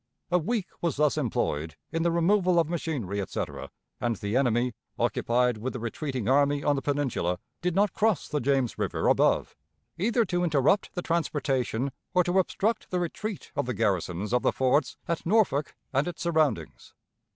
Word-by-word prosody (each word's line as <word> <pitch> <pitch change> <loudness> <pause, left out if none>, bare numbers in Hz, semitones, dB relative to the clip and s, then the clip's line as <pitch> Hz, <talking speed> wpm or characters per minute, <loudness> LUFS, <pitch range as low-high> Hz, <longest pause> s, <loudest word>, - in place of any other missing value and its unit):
A 180 - +4
week 205 +4 -1 0.2
was 170 -5 0
thus 150 0 +2
employed 80 - -1 0.2
in 165 - -1
the 170 - +2
removal 180 +2 +3
of 165 -3 +4
machinery, 145 - -2
etc, 95 - -4 0.3
and 120 -1 0
the 100 +2 -3
enemy, 125 -2 +2 0.2
occupied 125 -1 +1
with 130 +4 -3
the 125 - -4
retreating 125 +1 -3
army 145 +2 +3
on 145 - +3
the 135 - -2
Peninsula, 135 -11 0 0.2
did 180 -1 0
not 200 -1 +3
cross 220 -5 +1
the 150 - -1
James 135 -2 0
River - - 0
above, - - +3 0.4
either 230 +4 +2
to 175 -1 0
interrupt 165 +6 +2
the 180 - -3
transportation 140 -6 0 0.2
or 180 - +5
to 180 +2 +2
obstruct 215 +4 0
the 180 - 0
retreat 195 +4 -4
of 140 -3 -1
the 125 - -2
garrisons 100 -1 -1
of 125 - +3
the - - +2
forts 130 +3 +1
at 170 -2 -2
Norfolk 175 -7 +2 0.2
and 140 +4 +2
its 175 - -5
surroundings. 155 - 0
145 Hz, 175 wpm, -27 LUFS, 125-175 Hz, 0.4 s, or